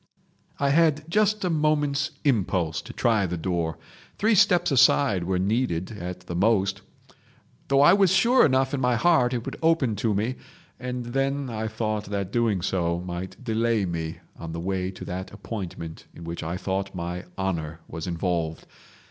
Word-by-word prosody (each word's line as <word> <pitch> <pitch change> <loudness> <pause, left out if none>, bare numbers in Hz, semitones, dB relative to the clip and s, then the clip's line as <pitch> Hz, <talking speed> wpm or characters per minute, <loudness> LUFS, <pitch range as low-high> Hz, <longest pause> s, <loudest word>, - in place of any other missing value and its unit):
"I 140 -1 +2
had 155 -1 +3
just 210 0 +2
a - - +1
moment's 150 -2 +1
impulse 95 - +1
to - - -10
try 110 -5 +1
the 90 0 -3
door, 85 -2 -2 0.4
three 220 +2 +3
steps 180 -5 +4
aside 125 -8 +4
were 95 0 0
needed 95 -2 0
at 90 -4 -6
the - - -7
most—though 100 +6 -2
I 145 - +7
was 195 -2 +4
sure 235 +7 +5
enough 130 0 +2
in 140 - -1
my 125 -1 +2
heart 125 -1 +4
that 125 - -1
it 120 - -7
would - - -5
open 160 -9 +2
to 110 -3 0
me—and 125 +2 -5
then 135 +1 -1
I 110 0 -3
thought 110 -1 -2
that 100 -1 -3
doing 110 -6 +1
so 85 -2 0
might 90 +5 -6
delay 115 -2 +1
me 80 -2 -4 0.2
on 80 -1 -7
the 85 - -4
way 95 +1 -2
to 95 - -8
that 95 +1 -5
appointment 95 -6 -7
in 85 - -10
which 85 +1 -5
I 85 +3 -3
thought 95 0 -3
my 90 0 -4
honour 85 -4 -3
was 80 0 -6
involved. 85 -2 -2
105 Hz, 170 wpm, -25 LUFS, 90-135 Hz, 0.4 s, I